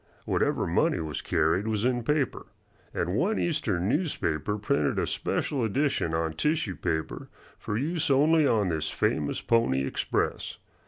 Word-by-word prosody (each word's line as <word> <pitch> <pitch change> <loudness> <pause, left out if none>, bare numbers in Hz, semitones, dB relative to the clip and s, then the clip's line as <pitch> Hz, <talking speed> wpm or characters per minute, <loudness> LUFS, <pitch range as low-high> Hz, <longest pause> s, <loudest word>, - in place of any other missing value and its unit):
Whatever - - +1
money - - +1
was 80 -3 -4
carried 80 +7 +1
was 110 0 0
in 125 -1 +1
paper, 145 +2 -1 0.4
and 90 +1 -2
one 200 - +1
Eastern 100 - 0
newspaper 105 - -1
printed 75 -8 0
a - - +1
special 135 -5 -1
edition 115 - 0
on 80 -1 -1
tissue 150 - 0
paper 80 +1 -3 0.3
for 105 - -3
use 155 +5 -1
only 150 +3 +4
on 105 -6 +2
this 80 -2 -1
famous 75 +3 -1
Pony 95 - +2
Express. - - -2
105 Hz, 145 wpm, -27 LUFS, -, 0.4 s, only